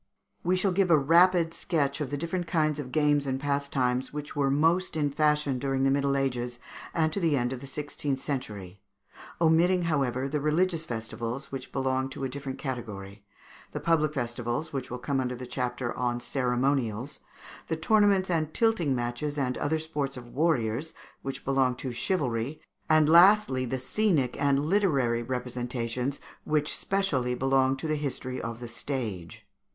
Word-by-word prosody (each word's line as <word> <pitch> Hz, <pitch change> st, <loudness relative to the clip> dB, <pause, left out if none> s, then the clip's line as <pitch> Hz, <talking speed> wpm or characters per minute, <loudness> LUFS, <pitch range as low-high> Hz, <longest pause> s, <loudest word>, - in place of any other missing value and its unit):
We 180 Hz, +2 st, +2 dB
shall 185 Hz, +1 st, +2 dB
give 185 Hz, 0 st, +2 dB
a 165 Hz, -, +7 dB
rapid 165 Hz, +3 st, +4 dB
sketch 145 Hz, -5 st, -1 dB
of 145 Hz, -, -2 dB
the 145 Hz, -, -2 dB
different 170 Hz, +3 st, -2 dB
kinds 155 Hz, -2 st, +1 dB
of 130 Hz, -3 st, -6 dB
games 145 Hz, -1 st, +2 dB
and 130 Hz, 0 st, -1 dB
pastimes 135 Hz, -3 st, 0 dB
which 150 Hz, 0 st, -6 dB
were 140 Hz, -2 st, +2 dB
most 165 Hz, +5 st, +2 dB
in 145 Hz, -2 st, +1 dB
fashion 150 Hz, -2 st, +1 dB
during 135 Hz, 0 st, 0 dB
the 135 Hz, -, +4 dB
Middle 140 Hz, 0 st, +1 dB
Ages 125 Hz, -3 st, -1 dB, 0.3 s
and 160 Hz, -2 st, +1 dB
to -, -, -1 dB
the 165 Hz, -6 st, +2 dB
end 120 Hz, 0 st, 0 dB
of 130 Hz, -, -5 dB
the 140 Hz, -, -9 dB
sixteenth 140 Hz, 0 st, -3 dB
century 105 Hz, -, -5 dB, 0.6 s
omitting, 170 Hz, +2 st, +4 dB
however, 135 Hz, -5 st, 0 dB
the 145 Hz, +1 st, -2 dB
religious 165 Hz, +2 st, +1 dB
festivals, 115 Hz, +2 st, -5 dB
which 135 Hz, -, -6 dB
belong 130 Hz, 0 st, 0 dB
to 135 Hz, -, -7 dB
a 135 Hz, -, -1 dB
different 135 Hz, 0 st, -6 dB
category; 105 Hz, -7 st, -6 dB, 0.5 s
the -, -, -3 dB
public 155 Hz, -2 st, +1 dB
festivals, 120 Hz, +3 st, -3 dB
which 135 Hz, -2 st, -4 dB
will 125 Hz, -, -4 dB
come 135 Hz, +2 st, -1 dB
under 125 Hz, -1 st, -1 dB
the 125 Hz, +1 st, -7 dB
chapter 125 Hz, -1 st, -3 dB
on 120 Hz, -1 st, -1 dB
Ceremonials; 125 Hz, -1 st, -1 dB, 0.5 s
the 160 Hz, -, -1 dB
tournaments 200 Hz, +1 st, +3 dB
and 155 Hz, -2 st, -1 dB
tilting 205 Hz, -, +2 dB
matches 120 Hz, +5 st, -3 dB
and 130 Hz, -3 st, 0 dB
other 160 Hz, +2 st, +1 dB
sports 145 Hz, -4 st, -3 dB
of 120 Hz, -1 st, -10 dB
warriors, 135 Hz, -2 st, 0 dB, 0.3 s
which 135 Hz, 0 st, -6 dB
belong 135 Hz, -2 st, +2 dB
to 130 Hz, 0 st, -5 dB
Chivalry; 130 Hz, -1 st, -1 dB, 0.3 s
and, 155 Hz, -1 st, +5 dB
lastly, 170 Hz, -5 st, +6 dB
the 130 Hz, +2 st, -2 dB
scenic 145 Hz, -, +1 dB
and 140 Hz, 0 st, +2 dB
literary 145 Hz, -, +2 dB
representations, 125 Hz, +1 st, -3 dB, 0.2 s
which 150 Hz, -1 st, 0 dB
specially 135 Hz, -11 st, 0 dB
belong 135 Hz, +1 st, +2 dB
to 160 Hz, -, -4 dB
the 155 Hz, -, 0 dB
history 130 Hz, -3 st, -3 dB
of 115 Hz, 0 st, -5 dB
the 120 Hz, -, -6 dB
stage. 110 Hz, -, -5 dB
140 Hz, 165 wpm, -28 LUFS, 125-155 Hz, 0.6 s, a